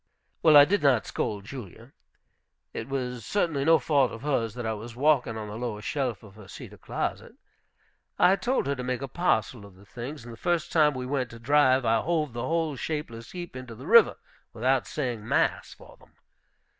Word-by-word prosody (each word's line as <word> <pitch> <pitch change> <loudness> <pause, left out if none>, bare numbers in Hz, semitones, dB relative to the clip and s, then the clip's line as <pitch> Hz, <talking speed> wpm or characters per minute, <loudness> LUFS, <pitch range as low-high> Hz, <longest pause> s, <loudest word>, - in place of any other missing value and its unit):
Well, 155 -2 +7
I 145 - +10
did 200 +6 +1
not 130 -8 +3
scold 100 -2 -3
Julia. 115 -7 -10 0.8
It 110 - -6
was 125 -3 -3
certainly 165 -9 0
no 165 +2 +6
fault 140 -2 +2
of 115 - -9
hers 120 -7 -1
that 120 -1 -5
I 110 - -1
was 115 +2 -8
walking 130 -4 +2
on 110 -1 -6
the 105 +2 -7
lower 120 -4 -4
shelf 130 -5 -2
of 105 -3 -14
her 105 -1 -14
cedar - - -11
closet. - - -4 0.8
I 180 +2 +5
told 240 - -1
her 140 - 0
to 125 - -6
make 125 +1 -3
a - - -3
parcel 125 - 0
of 100 -2 -14
the 100 +2 -18
things, 125 +5 -8
and 120 0 -10
the - - -12
first 170 +2 -1
time 150 -3 +4
we 130 -1 -4
went 130 -2 -2
to 115 - -11
drive 130 +1 +3
I 115 0 +3
hove 155 -6 -1
the 120 - -4
whole 165 -2 0
shapeless 125 -5 -5
heap 175 -5 -7
into 130 -3 -8
the 130 +5 -11
river, 230 +4 +6 0.4
without 130 +3 +1
saying 120 -7 -4
mass - - +1
for - - -16
them. - - -23
130 Hz, 205 wpm, -27 LUFS, 115-150 Hz, 0.8 s, I